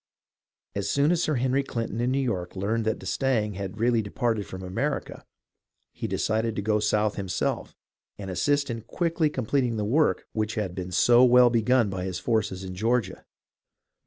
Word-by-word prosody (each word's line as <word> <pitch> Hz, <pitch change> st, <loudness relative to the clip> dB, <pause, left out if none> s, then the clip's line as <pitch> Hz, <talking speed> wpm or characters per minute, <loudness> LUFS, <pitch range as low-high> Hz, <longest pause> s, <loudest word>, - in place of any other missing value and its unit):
As 100 Hz, 0 st, -2 dB
soon 140 Hz, +6 st, +3 dB
as 175 Hz, -1 st, +2 dB
Sir 155 Hz, -3 st, +1 dB
Henry 130 Hz, +2 st, +1 dB
CHnton 115 Hz, -4 st, -4 dB
in 120 Hz, -, +1 dB
New 130 Hz, -, +1 dB
York 105 Hz, -11 st, -2 dB
learned 110 Hz, +4 st, -1 dB
that 110 Hz, -, 0 dB
d'Estaing 115 Hz, -6 st, -1 dB
had 100 Hz, +1 st, -6 dB
really 115 Hz, 0 st, +3 dB
departed 110 Hz, 0 st, -2 dB
from 95 Hz, 0 st, -8 dB
America, 115 Hz, +11 st, -3 dB, 0.7 s
he -, -, -4 dB
decided 110 Hz, 0 st, -1 dB
to -, -, -2 dB
go 105 Hz, 0 st, +2 dB
South 105 Hz, 0 st, +1 dB
himself 95 Hz, -3 st, -2 dB, 0.4 s
and 95 Hz, -2 st, -6 dB
assist 145 Hz, +8 st, +1 dB
in 115 Hz, -1 st, -4 dB
quickly 165 Hz, +6 st, 0 dB
completing 125 Hz, -3 st, 0 dB
the 105 Hz, -, -1 dB
work 150 Hz, +9 st, +2 dB
which 110 Hz, 0 st, -2 dB
had 105 Hz, -5 st, -2 dB
been 90 Hz, 0 st, -5 dB
so 120 Hz, +7 st, +5 dB
well 125 Hz, -1 st, +6 dB
begun 115 Hz, -1 st, +2 dB
by 95 Hz, -1 st, -4 dB
his 95 Hz, -2 st, -3 dB
forces 105 Hz, -2 st, -1 dB
in 95 Hz, -1 st, -6 dB
Georgia. 110 Hz, +1 st, -1 dB
110 Hz, 175 wpm, -26 LUFS, 100-125 Hz, 0.7 s, well